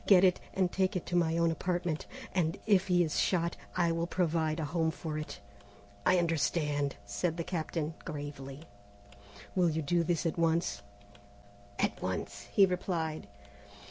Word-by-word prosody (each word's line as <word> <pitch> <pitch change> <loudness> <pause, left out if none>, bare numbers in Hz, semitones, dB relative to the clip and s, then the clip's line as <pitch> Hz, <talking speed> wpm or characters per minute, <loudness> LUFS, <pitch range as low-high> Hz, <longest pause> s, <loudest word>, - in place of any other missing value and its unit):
Get 190 -2 +7
it, 185 -1 +5 0.2
and 185 -2 +2
take 190 +1 +1
it 180 - -2
to 175 - -2
my 165 -1 +3
own 170 0 +3
apartment, 175 -2 -1 0.3
and 175 0 +1
if 195 -3 +4
he 175 -1 +4
is 155 -3 0
shot, 170 -2 +1 0.2
I 170 -2 +3
will 165 +1 0
provide 165 -3 +1
a 160 - -1
home 160 +2 +1
for 160 -1 -4
it." 155 - -6 0.7
"I 185 - +6
understand," 150 -4 +1
said 155 - -1
the 170 - -1
Captain 160 -2 -2
gravely. 145 -1 -6 0.9
"Will 180 -2 +3
you 160 0 -1
do 170 +4 +2
this 170 0 0
at 165 +1 0
once?" 165 -4 +1 1.0
"At - - 0
once," 100 +2 -4
he 200 - +7
replied. 170 - -2
165 Hz, 160 wpm, -32 LUFS, 155-180 Hz, 1.0 s, Get